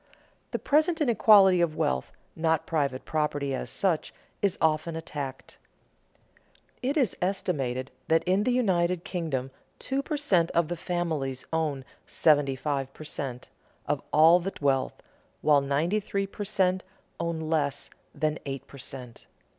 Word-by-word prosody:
The - - -2
present 315 +3 +2
inequality 205 - +6
of 165 -3 +1
wealth, 65 0 -1 0.2
not 160 -1 +1
private 140 -5 -1
property 145 -3 -1
as 130 - -3
such, 180 -5 0 0.3
is 200 -3 +1
often 160 +1 +1
attacked. 140 -4 -6 1.2
It 275 +5 0
is 255 -9 +2
estimated 140 -9 -1 0.2
that 160 0 +3
in 185 +3 +2
the 250 - +1
United 180 -8 +1
Kingdom 140 -8 -3 0.3
two 270 +1 -2
per 300 +2 -3
cent. 185 - +2
of 170 -2 +2
the 175 - -1
families 160 -7 -2
own 150 -5 -1 0.2
seventy 145 -4 +3
five 135 -1 -2
per - - -9
cent. 135 -4 -5 0.4
of - - 0
all 165 +3 +7
the 195 +3 -4
wealth, 135 -2 +1 0.5
while 145 -2 +5
ninety 150 +9 +1
three 200 -1 -2
per 205 +1 -6
cent. 185 -2 +1 0.4
own 170 -1 -2
less 155 -3 -1 0.2
than 155 0 -1
eight 135 -1 -5
per 140 - -13
cent. 125 -3 -8
160 Hz, 145 wpm, -27 LUFS, 140-185 Hz, 1.2 s, all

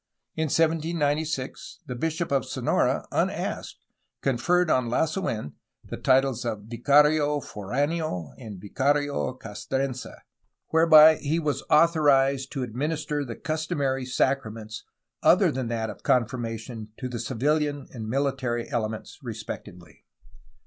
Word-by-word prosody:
In 160 - 0
1796 155 -3 -1
the 125 - -5
bishop 160 +6 -2
of 135 -3 +2
Sonora, - - 0
unasked, - - -2 0.5
conferred 165 +7 +2
on 125 -2 +2
Lasu^n 155 - -1 0.3
the - - -6
titles 130 -2 +2
of 110 -4 -3
Vicario 145 +6 +3
Fordneo 130 - -2
and 110 -6 -8
Vicario 140 +7 0
Castrense, 130 +4 -3 0.6
whereby 160 -1 +7
he 150 +3 -1
was 150 -3 -1
authorized 140 -5 +4
to 135 -3 -3
administer 145 +4 -2
the 120 -4 -6
customary 145 -4 -2
sacraments 115 -5 -2 0.4
other - - +5
than 130 -1 -3
that 115 -1 -2
of - - -13
confirmation 115 -2 -1
to 130 - -4
the 120 -2 -5
civihan 145 +5 0
and 110 -3 -6
mihtary 130 -3 -1
elements 110 -3 -3
respectively. 85 -3 -8
135 Hz, 115 wpm, -26 LUFS, 120-150 Hz, 0.6 s, whereby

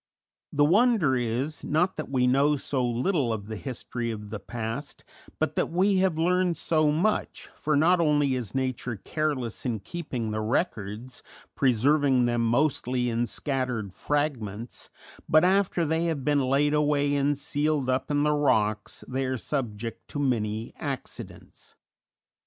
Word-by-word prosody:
The 145 0 +3
wonder 200 - +4
is, 125 +5 -2
not 170 +5 +1
that 155 - -5
we 130 -2 +2
know 140 +4 +3
so 135 -2 -1
little 125 +3 0
of 105 -3 -3
the 110 +1 -6
history 120 0 -4
of 105 -2 -6
the 105 - -4
past, 115 +6 -6 0.3
but - - -1
that - - 0
we 190 +3 +2
have 185 -4 +2
learned 180 +1 +2
so 155 -2 +2
much, 185 +8 -1
for 150 0 -1
not 170 +5 +4
only 145 -4 +3
is 125 -5 -4
nature 130 -2 -2
careless 130 0 -2
in 120 -4 -1
keeping 125 - -4
the 110 0 -2
records 115 - -2 0.3
preserving 135 +1 +3
them 120 -1 +1
mostly 125 0 +1
in 120 +1 0
scattered 125 - -2
fragments 120 -5 -3 0.4
but 155 +2 +6
after 185 -2 +2
they 160 +2 0
have 160 -6 -2
been 145 -1 +3
laid 140 +3 +2
away 145 -1 +2
and 145 0 +1
sealed 145 0 0
up 130 +2 0
in 145 0 +2
the 150 0 +3
rocks 110 -7 0
they 130 +1 -2
are 130 0 -1
subject 115 -4 -4
to 150 - -6
many 110 -5 -1
accidents. - - -7
135 Hz, 150 wpm, -27 LUFS, 120-150 Hz, 0.4 s, but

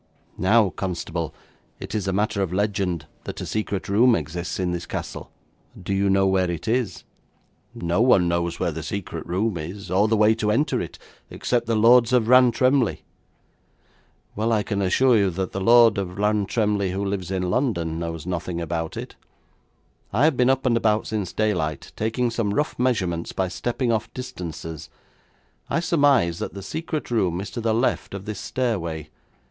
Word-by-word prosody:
Now, 105 0 +4
constable, 85 -4 -3 0.5
it - - -7
is 105 -3 -2
a - - +1
matter 100 +1 0
of 95 -3 -1
legend 95 -5 -1 0.2
that - - -6
a - - -4
secret 105 -3 -3
room 115 +5 +4
exists 85 0 -4
in 90 -1 0
this 90 0 -4
castle. - - -6 0.5
Do 95 +2 -3
you 100 0 +2
know 95 0 +3
where 95 -1 +2
it 85 +3 -4
is?' 115 -5 -1 0.7
'No 85 +4 0
one 110 -8 +5
knows 85 0 -1
where 85 - 0
the 80 +1 -5
secret 95 +4 -5
room 95 +1 -1
is, 90 +4 -7
or 100 +4 +3
the 110 0 +2
way 105 +1 +5
to 110 -1 -1
enter 135 +8 +1
it, - - -7 0.3
except 120 -2 -1
the 115 - +1
Lords 120 +2 +5
of 120 -3 +3
Rantremly.' 125 0 +4 1.3
'Well, 110 +3 0
I 110 -2 +2
can 100 -2 -2
assure 120 +7 +4
you 100 -2 +3
that 95 +1 -3
the 95 - -4
Lord 115 0 +6
of 90 -1 -5
Rantremly 105 -1 +1
who 100 +1 -2
lives 95 -3 -3
in 90 -2 -1
London 85 - 0
knows 85 -2 -5
nothing 90 -1 -3
about 85 -1 -3
it. - - -7 1.0
I 110 +7 +2
have 155 -2 +4
been 125 +1 +3
up 135 0 +1
and 120 -2 +3
about 110 -2 +2
since 105 -4 -3
daylight, 90 -9 -1
taking 115 +3 -1
some 110 -3 -1
rough 150 - 0
measurements 95 -10 0
by 95 -1 -1
stepping 120 +5 -1
off 110 -1 -1
distances. 80 - -7 0.8
I - - +1
surmise 145 - +3
that - - -5
the 100 - -7
secret 155 - -4
room 90 -7 +1
is 100 - -6
to 120 - -4
the 110 -1 +1
left 120 -4 0
of 100 0 -7
this 105 -2 -5
stairway. 85 - -3
100 Hz, 180 wpm, -24 LUFS, 90-115 Hz, 1.3 s, Lord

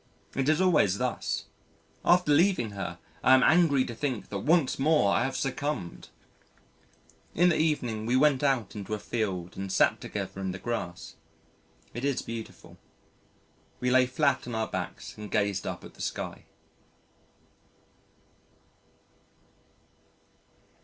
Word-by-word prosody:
It 135 +1 0
is 155 +1 +3
always 155 - +3
thus. - - -2 0.6
After 180 -3 +4
leaving 160 - +3
her, 95 -3 -5 0.3
I 130 - +7
am 130 - +4
angry 155 -5 +4
to 120 - -6
think 120 -4 -3
that 100 - -3
once 150 - +2
more 140 -9 +3
I 95 - +2
have 135 - -3
succumbed. 135 - -3 1.3
In 175 +2 +5
the 165 - +2
evening 125 -9 0
we 125 - +2
went 135 0 +4
out 130 -8 0
into 105 +1 -4
a - - -4
field 95 -5 -3
and 95 0 -5
sat - - +3
together 95 - -5
in 95 -1 -2
the - - -5
grass. 95 -6 -5 0.8
It 120 - -5
is 140 -2 0
beautiful. 115 -1 -8 1.0
We 125 0 0
lay 130 0 +5
flat 130 0 +1
on 120 - -4
our 110 0 -1
backs - - -6
and 105 -1 -7
gazed 100 -2 0
up - - -5
at - - -12
the - - -12
sky. - - -4
125 Hz, 140 wpm, -28 LUFS, 100-145 Hz, 1.3 s, I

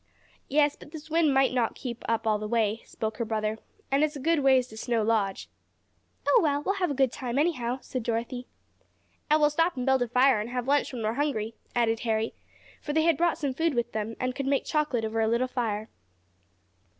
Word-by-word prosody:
"Yes, 290 +1 +3
but - - -14
this 315 0 -10
wind 325 -2 +3
may 270 -1 +3
not 240 -3 0
keep 240 -3 -6
up 230 0 0
all 215 -1 +2
the 215 - -4
way," 225 -1 0
spoke 220 -1 -4
her - - -1
brother. 215 -1 -2 0.3
"And 275 +2 +3
it's 305 0 0
a - - -5
good 325 +3 +2
ways 265 -2 +4
to 220 - -11
Snow 230 -1 0
Lodge." 210 -3 0 0.8
"Oh, - - +6
well, 290 -3 +1
we'll 390 +4 0
have 360 - +2
a 285 - -2
good 265 -2 +3
time, 250 -1 -4
anyhow," 260 -6 +1
said 255 - -4
Dorothy. 235 +2 -3 0.8
"And 305 +1 +5
we'll 295 0 +4
stop 330 +1 +1
and 250 - -2
build 265 -1 +3
a 245 - +1
fire 250 0 +4
and 220 - -5
have 250 0 -3
lunch 285 +1 +2
when 240 -4 -5
we're 215 +1 0
hungry," 235 -5 -1 0.2
added 225 -2 +2
Harry, 225 -1 -1 0.5
for 295 - -4
they 315 +1 +3
had 335 -1 +4
brought 340 +2 +1
some 280 -3 -2
food 320 +1 0
with 240 0 -1
them, 220 +1 -3
and 255 0 -1
could 275 +1 -4
make 275 0 +1
chocolate 295 -7 0
over 225 +1 -1
a 220 - +2
little 235 +3 +1
fire. 220 -4 -2
255 Hz, 220 wpm, -27 LUFS, 225-290 Hz, 0.8 s, Oh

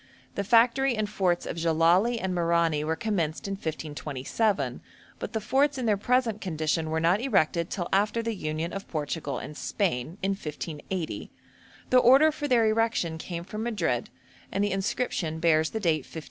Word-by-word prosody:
The 200 - -2
factory 240 +4 +4
and 215 -1 0
forts 185 -4 0
of - - -4
Jellali 170 +8 +3
and 190 -2 -2
Merani 170 -3 +2
were 160 +1 0
commenced 175 -6 -2
in - - -3
1527, 150 - -2 0.4
but 210 - -5
the 220 - 0
forts 270 +6 +2
in 255 - -2
their 215 -2 +3
present 230 0 +1
condition 160 -2 -1
were 160 +1 0
not 175 +6 +2
erected 170 - +1
till 175 -4 -3
after 210 +4 +2
the 230 0 -1
union 155 -2 -3
of 195 - -6
Portugal 155 0 -3
and 150 - -7
Spain, 165 - -2
in 195 - +2
1580; 165 0 -5 0.6
the 255 - +7
order 270 +6 +6
for 295 -1 -4
their 240 -4 +4
erection 215 -7 +1
came 170 0 -5
from 215 +4 -6
Madrid, 190 - -1 0.4
and 195 - 0
the 205 - 0
inscription 190 -4 -1
bears 160 -1 +3
the 220 - -3
date 165 -6 +2
1588. 155 +3 -9
185 Hz, 175 wpm, -27 LUFS, 160-225 Hz, 0.6 s, the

